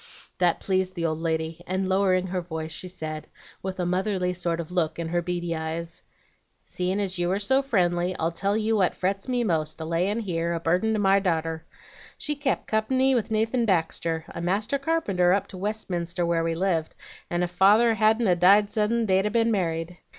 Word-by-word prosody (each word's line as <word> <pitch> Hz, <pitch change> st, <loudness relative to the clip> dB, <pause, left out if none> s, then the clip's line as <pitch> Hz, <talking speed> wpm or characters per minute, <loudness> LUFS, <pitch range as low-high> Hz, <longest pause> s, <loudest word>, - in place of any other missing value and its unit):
"That 175 Hz, -2 st, +3 dB
pleased 185 Hz, -1 st, 0 dB
the 170 Hz, -2 st, -2 dB
old 155 Hz, -1 st, -1 dB
lady, 160 Hz, 0 st, -2 dB
and, 185 Hz, +1 st, -1 dB
lowering 185 Hz, -1 st, +2 dB
her 185 Hz, 0 st, -2 dB
voice, 160 Hz, -2 st, -6 dB
she 185 Hz, -, -4 dB
said, 155 Hz, -4 st, -5 dB, 0.3 s
with 190 Hz, 0 st, -5 dB
a 180 Hz, -, 0 dB
motherly 185 Hz, 0 st, 0 dB
sort 170 Hz, -2 st, -2 dB
of 170 Hz, 0 st, -6 dB
look 165 Hz, -3 st, 0 dB
in 165 Hz, -1 st, -3 dB
her 175 Hz, +1 st, 0 dB
beady 175 Hz, -1 st, -2 dB
eyes: 165 Hz, +1 st, -5 dB, 0.6 s
'Seein' 185 Hz, +2 st, -2 dB
as 190 Hz, -3 st, -2 dB
you 175 Hz, 0 st, +1 dB
are 195 Hz, -, +1 dB
so 265 Hz, +7 st, +2 dB
friendly, 180 Hz, -8 st, +1 dB
I'll 165 Hz, +1 st, 0 dB
tell 200 Hz, +5 st, 0 dB
you 220 Hz, 0 st, +1 dB
what 185 Hz, -3 st, +2 dB
frets 195 Hz, +3 st, -2 dB
me 250 Hz, -1 st, 0 dB
most, 160 Hz, -6 st, -1 dB
a 160 Hz, -, -4 dB
layin' 180 Hz, +7 st, 0 dB
here, 170 Hz, -4 st, -1 dB
a 165 Hz, -, -2 dB
burden 180 Hz, +7 st, +1 dB
to 215 Hz, -, 0 dB
my 195 Hz, -1 st, +4 dB
darter. 165 Hz, -3 st, -2 dB, 0.5 s
She 295 Hz, -, -3 dB
kep' 280 Hz, -2 st, -1 dB
company 260 Hz, +5 st, +2 dB
with 235 Hz, -3 st, 0 dB
Nathan 225 Hz, +2 st, +1 dB
Baxter, 165 Hz, -3 st, 0 dB
a -, -, -6 dB
master 210 Hz, +10 st, 0 dB
carpenter 205 Hz, -, +1 dB
up 200 Hz, 0 st, +1 dB
to 185 Hz, -, -9 dB
Westminster 180 Hz, -4 st, -2 dB
where 170 Hz, -1 st, +1 dB
we 165 Hz, 0 st, -1 dB
lived, 170 Hz, -3 st, -1 dB, 0.3 s
and 175 Hz, +1 st, 0 dB
ef 175 Hz, -, -2 dB
father 210 Hz, +6 st, +5 dB
hadn't 220 Hz, +2 st, +3 dB
a 180 Hz, -, +4 dB
died 200 Hz, +4 st, +5 dB
suddin' 225 Hz, +2 st, +1 dB
they'd 190 Hz, 0 st, +2 dB
a -, -, 0 dB
ben 230 Hz, +1 st, +2 dB
married. 175 Hz, -3 st, -2 dB
185 Hz, 200 wpm, -25 LUFS, 170-210 Hz, 0.6 s, father